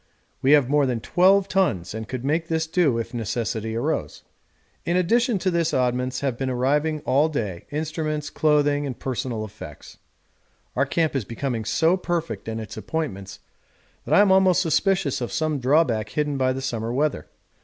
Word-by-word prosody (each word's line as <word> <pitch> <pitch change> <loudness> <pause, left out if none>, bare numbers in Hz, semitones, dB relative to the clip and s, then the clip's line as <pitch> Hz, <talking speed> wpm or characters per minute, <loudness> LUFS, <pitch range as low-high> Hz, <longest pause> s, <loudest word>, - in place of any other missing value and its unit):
We 135 +3 +4
have 145 -4 +5
more 145 0 +2
than 125 -2 -1
12 190 - +3
tons 115 - 0
and 110 0 -6
could 130 +1 -5
make 160 +3 0
this 160 -1 0
do 160 -6 +2
if 115 +1 -4
necessity 115 -1 -3
arose. 115 - -2 0.6
In 175 +1 0
addition 230 +6 +2
to 185 0 0
this 170 -2 0
oddments 125 0 0
have 135 -4 -2
been 135 -1 -1
arriving 145 +5 0
all 145 +4 +2
day 105 - -4
instruments, 155 0 -3
clothing, 145 -1 +2
and 125 - -5
personal 125 -4 -3
effects. 100 -8 -11 0.8
Our 140 +2 +1
camp 160 +1 0
is 135 - 0
becoming 115 0 -4
so 165 - +2
perfect 175 -6 -3
in 110 0 -3
its 110 - -8
appointments 100 - -5 0.6
that - - +2
I - - +7
am 205 -2 +4
almost 190 -1 +4
suspicious 180 -4 +1
of 120 - -3
some 155 -2 -1
drawback 125 -5 +2
hidden 150 -1 -1
by 130 -1 +1
the 135 - -5
summer 115 -3 -3
weather. 140 - -1
140 Hz, 175 wpm, -24 LUFS, 120-160 Hz, 0.8 s, I